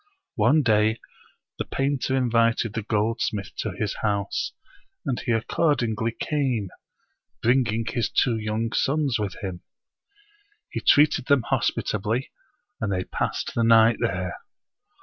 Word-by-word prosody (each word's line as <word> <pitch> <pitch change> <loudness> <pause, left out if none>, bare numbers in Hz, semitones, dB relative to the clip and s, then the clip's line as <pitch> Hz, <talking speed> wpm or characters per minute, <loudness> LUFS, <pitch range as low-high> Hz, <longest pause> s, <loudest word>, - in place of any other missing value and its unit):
One 155 +1 +4
day 110 -1 +3 0.6
the - - -1
painter 135 -1 -1
invited 115 -3 +2
the 115 - -2
goldsmith 110 -2 -1
to - - -2
his - - -3
house; 100 -2 -1 0.5
and 130 -3 -1
he - - -2
accordingly 115 -2 0
came, 130 - -1 0.7
bringing 115 -2 +2
his 115 0 -1
two 120 -3 +2
young 110 +1 -2
sons 140 -4 +1
with 100 -3 -3
him. 90 -3 -5 1.1
He - - -3
treated 145 -3 +4
them 140 -4 +4
hospitably, 110 +7 -1 0.5
and 110 -5 -1
they 90 -1 0
passed - - -3
the 115 - +1
night 115 0 +6
there. 90 0 -2
115 Hz, 125 wpm, -25 LUFS, 105-125 Hz, 1.1 s, night